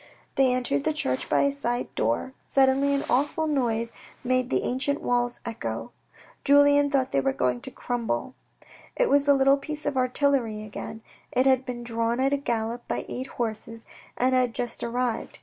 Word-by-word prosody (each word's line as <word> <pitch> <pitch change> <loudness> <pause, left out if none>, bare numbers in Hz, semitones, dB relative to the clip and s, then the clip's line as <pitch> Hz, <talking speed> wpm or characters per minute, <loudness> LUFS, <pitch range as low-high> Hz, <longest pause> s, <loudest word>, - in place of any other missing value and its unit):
They 265 -2 +3
entered 255 +3 0
the 315 - +1
church 130 - -2
by - - +3
a 280 0 +2
side 245 -3 -3
door; 115 - -1
suddenly 275 +1 +3
an 280 - -1
awful 290 +5 +1
noise 235 -6 0 0.3
made 255 0 +1
the - - +1
ancient 280 +3 0
walls 245 0 0
echo. 230 -1 -4 0.5
Julien 285 0 +5
thought 270 -2 +1
they 135 - +2
were 135 0 +1
going 125 -2 0
to - - -7
crumble. 235 - -3 0.6
It - - +2
was 285 0 +4
the 285 -1 +5
little 275 +1 +4
piece 300 +2 -6
of 290 -2 -1
artillery 255 -4 +1
again. 215 +1 -8 0.3
It 255 - +2
had 260 -1 +3
been 240 -1 -5
drawn 230 0 -1
at 270 +1 +2
a - - +3
gallop 235 -3 -3
by - - -2
eight 255 +2 -4
horses 225 -1 -5 0.3
and 255 +1 +2
had 250 -2 +2
just 240 -1 -3
arrived. 240 0 -2
255 Hz, 180 wpm, -26 LUFS, 230-280 Hz, 0.6 s, Julien